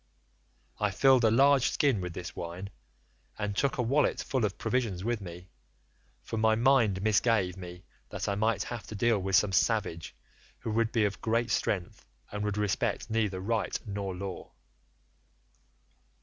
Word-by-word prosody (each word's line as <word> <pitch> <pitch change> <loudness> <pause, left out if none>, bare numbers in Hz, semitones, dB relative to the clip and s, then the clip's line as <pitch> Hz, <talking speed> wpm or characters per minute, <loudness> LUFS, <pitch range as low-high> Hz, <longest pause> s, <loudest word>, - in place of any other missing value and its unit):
I 105 - +2
filled 130 +4 +4
a 110 - +5
large 135 +3 +4
skin 140 -9 +1
with 90 -1 -5
this 85 0 -7
wine, 90 +4 -6 0.7
and 105 -1 -3
took 135 +5 0
a 125 - +1
wallet 140 +6 +2
full 130 -5 0
of 100 - -3
provisions 110 -6 -1
with 115 -1 -1
me, 90 0 -10 0.7
for 115 - -5
my 110 0 +3
mind 115 -6 +3
misgave 105 -3 +2
me 90 -1 -9 0.3
that - - -4
I 100 - +1
might 110 +1 +1
have 120 -2 -7
to 110 - -7
deal 115 0 +2
with 95 0 0
some 95 +3 +4
savage 95 -4 0 0.4
who 110 - -5
would 115 +1 +1
be 110 -3 +2
of 105 0 -3
great 115 +1 0
strength, 90 -3 -1 0.3
and 105 0 -3
would 105 0 -2
respect 105 +2 -1
neither 105 -4 0
right 110 +3 -1
nor 100 -3 -4
law. 95 0 -7
105 Hz, 165 wpm, -29 LUFS, 95-115 Hz, 0.7 s, a